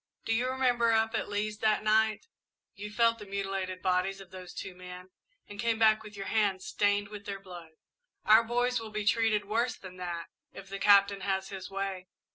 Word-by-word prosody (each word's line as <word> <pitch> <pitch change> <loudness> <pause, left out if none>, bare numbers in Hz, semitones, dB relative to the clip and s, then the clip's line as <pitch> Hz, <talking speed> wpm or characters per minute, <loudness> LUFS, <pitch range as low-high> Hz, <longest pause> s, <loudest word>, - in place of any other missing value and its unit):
Do 225 - +1
you 245 +3 +1
remember, 245 -3 +2
up 225 0 +2
at - - -2
Lee's 210 +1 -2
that 215 -1 +2
night, 215 0 +2 0.5
you 205 +1 -7
felt 230 +1 +3
the 210 - -9
mutilated 195 -2 -3
bodies 185 +1 +1
of 190 -2 -13
those 185 -1 -9
two 190 - -7
men, 180 0 -11 0.4
and 205 0 -11
came 230 0 +1
back, 220 -1 +4
with 210 -1 -11
your 195 - -5
hands 200 -4 0
stained 205 0 +1
with 210 -1 -9
their 200 -1 -4
blood? 175 -4 -11 0.5
Our 220 +2 +7
boys 245 +1 0
will 225 -1 -7
be 210 -1 -4
treated 215 -1 +2
worse 230 +4 0
than 185 -1 -11
that, 175 -2 -4 0.3
if 195 0 -11
the 195 0 -5
Captain 200 -1 +5
has 190 0 -1
his 195 -1 -7
way." 195 -1 -4
205 Hz, 200 wpm, -30 LUFS, 190-220 Hz, 0.5 s, Our